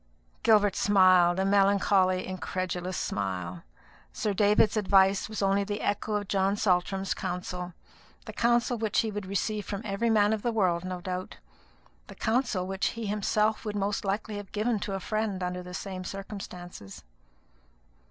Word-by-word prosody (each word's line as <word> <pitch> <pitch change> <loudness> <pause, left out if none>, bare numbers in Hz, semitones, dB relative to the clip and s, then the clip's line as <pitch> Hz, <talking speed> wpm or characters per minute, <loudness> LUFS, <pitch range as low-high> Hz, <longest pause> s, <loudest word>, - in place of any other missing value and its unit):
Gilbert 205 -3 +4
smiled, 185 -3 +5
a 190 - +1
melancholy 195 -2 +3
incredulous 185 -1 -3
smile. 90 -3 -3 0.5
Sir 210 - -2
David's 210 +2 +3
advice 195 -1 +3
was 215 -2 -3
only 195 +1 +2
the 205 +1 -4
echo 210 +1 -1
of 205 -1 -2
John 195 +1 +1
Saltram's 190 -1 +1
counsel 180 -1 -5 0.5
the - - -8
counsel 240 0 +2
which 220 -2 +1
he 220 - -3
would 205 -2 -5
receive 205 +2 -1
from 200 +1 -5
every 210 +3 0
man 210 -1 +4
of 220 - -2
the 240 - 0
world, 180 -6 +1
no 185 -1 -5
doubt 185 0 -5 0.7
the - - -11
counsel 220 -5 0
which 190 +1 -1
he 230 - -4
himself 210 +1 0
would 210 -1 -4
most 205 0 -1
likely 205 +2 -2
have 205 -1 -8
given 215 +1 0
to 195 0 -3
a - - -3
friend 215 -2 -2
under 180 0 -3
the 180 0 -8
same 185 -2 -5
circumstances. 180 - -8
195 Hz, 160 wpm, -28 LUFS, 185-210 Hz, 0.7 s, smiled